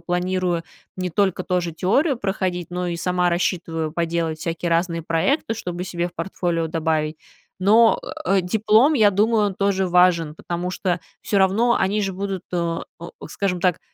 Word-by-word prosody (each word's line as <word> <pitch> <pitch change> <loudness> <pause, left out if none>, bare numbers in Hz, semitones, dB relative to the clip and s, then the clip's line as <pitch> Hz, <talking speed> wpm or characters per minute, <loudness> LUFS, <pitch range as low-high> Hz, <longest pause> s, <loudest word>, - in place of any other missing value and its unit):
планирую 180 0 -1 0.3
не 185 -1 -3
только 190 0 +1
тоже 180 -2 -1
теорию 260 - +1
проходить, 185 -5 -2
но 180 0 -3
и 170 -1 -2
сама 180 +1 +1
рассчитываю 165 -3 -1
поделать 165 -1 -1
всякие 165 +1 -3
разные 170 0 0
проекты, 195 - 0
чтобы 180 -4 -5
себе 175 -1 -2
в - - -20
портфолио 175 -4 -2
добавить. 160 -1 -1 0.4
Но, 220 +4 +5 0.2
э, 195 +1 +3
диплом, 220 - +3
я 215 -6 +5
думаю, 210 0 +2
тоже 195 -1 +1
важен. 175 -3 +3
Потому 175 +2 -4
что 180 -1 -1 0.2
всё 205 - -2
равно 215 +6 +3
они 205 +3 +1
же 195 -2 -1
будут 195 -1 -4
а, 170 -1 -1 0.4
скажем 185 -3 -2
так, 180 -1 +1
180 Hz, 155 wpm, -22 LUFS, 170-195 Hz, 0.4 s, Но